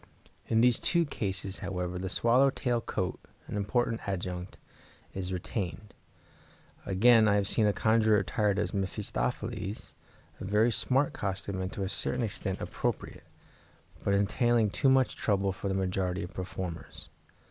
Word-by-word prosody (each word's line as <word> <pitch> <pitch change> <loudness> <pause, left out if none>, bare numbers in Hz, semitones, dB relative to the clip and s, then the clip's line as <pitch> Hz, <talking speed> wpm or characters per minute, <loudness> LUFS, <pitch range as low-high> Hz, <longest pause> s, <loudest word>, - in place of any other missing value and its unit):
In 110 0 +3
these 120 -1 +4
two 170 -1 +2
cases, 100 -7 -3
however, 90 -1 -3
the 95 0 -3
swallow 125 +7 +4
tail 120 -3 -1
coat, 95 -4 -3 0.3
an - - -6
important 115 +3 0
adjunct, 90 -1 -4 0.6
is 95 -1 -3
retained. 95 +2 -4 0.9
Again, 110 +3 +6
I 100 - +4
have 100 -1 +1
seen 110 +1 +2
a - - +4
conjurer 110 0 +3
attired 105 -1 +1
as 105 - -1
Mephistopheles, 95 +1 -3 0.5
a - - -7
very 105 +5 +3
smart 130 +6 +1
costume, 100 -1 -3
and 95 0 -3
to 100 - -3
a - - -1
certain 125 +4 -1
extent 95 -3 -3
appropriate, - - -3 0.8
but 100 - +2
entailing 110 +2 +2
too 135 - +2
much 130 -1 +3
trouble 100 -2 +1
for 95 +1 -5
the 95 - 0
majority 95 -1 -1
of 90 - -8
performers. 90 -3 -6
100 Hz, 145 wpm, -30 LUFS, 95-115 Hz, 0.9 s, Again